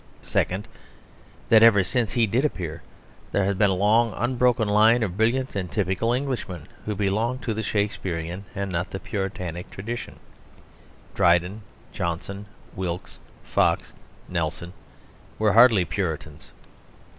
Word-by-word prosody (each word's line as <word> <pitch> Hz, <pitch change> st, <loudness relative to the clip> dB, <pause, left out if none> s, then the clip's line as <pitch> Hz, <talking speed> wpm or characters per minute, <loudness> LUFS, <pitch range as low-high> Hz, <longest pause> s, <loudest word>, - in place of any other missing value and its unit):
Second, 95 Hz, +3 st, -1 dB, 0.8 s
that 110 Hz, -1 st, +7 dB
ever 110 Hz, -4 st, +7 dB
since 115 Hz, +2 st, -1 dB
he 120 Hz, -2 st, +3 dB
did 115 Hz, +6 st, +1 dB
appear 85 Hz, -, -3 dB, 0.5 s
there 100 Hz, -, +1 dB
has 100 Hz, +1 st, +1 dB
been 100 Hz, +1 st, +3 dB
a 95 Hz, -, +1 dB
long 105 Hz, +3 st, +3 dB
unbroken 120 Hz, -1 st, +2 dB
line 110 Hz, +3 st, +5 dB
of 95 Hz, -5 st, -3 dB
brilliant 120 Hz, +5 st, +1 dB
and 90 Hz, -4 st, -3 dB
typical 100 Hz, +3 st, 0 dB
Englishmen 120 Hz, -, -3 dB, 0.2 s
who 105 Hz, -, -1 dB
belonged 110 Hz, +6 st, -1 dB
to 115 Hz, -, -1 dB
the 110 Hz, -, -3 dB
Shakespearian 95 Hz, -4 st, -2 dB
and 100 Hz, -1 st, -3 dB
not 90 Hz, +1 st, -2 dB
the 95 Hz, -, -5 dB
Puritanic 90 Hz, -5 st, -4 dB
tradition; 115 Hz, +5 st, -6 dB, 0.9 s
Dryden, 90 Hz, +3 st, +2 dB, 0.3 s
Johnson, 95 Hz, +4 st, -4 dB, 0.3 s
Wilkes, 90 Hz, 0 st, -5 dB, 0.2 s
Fox, -, -, +1 dB, 0.3 s
Nelson, 85 Hz, +1 st, -3 dB, 0.6 s
were 105 Hz, -1 st, +2 dB
hardly 115 Hz, -5 st, +6 dB
Puritans. 80 Hz, -4 st, -4 dB
100 Hz, 130 wpm, -25 LUFS, 90-115 Hz, 0.9 s, that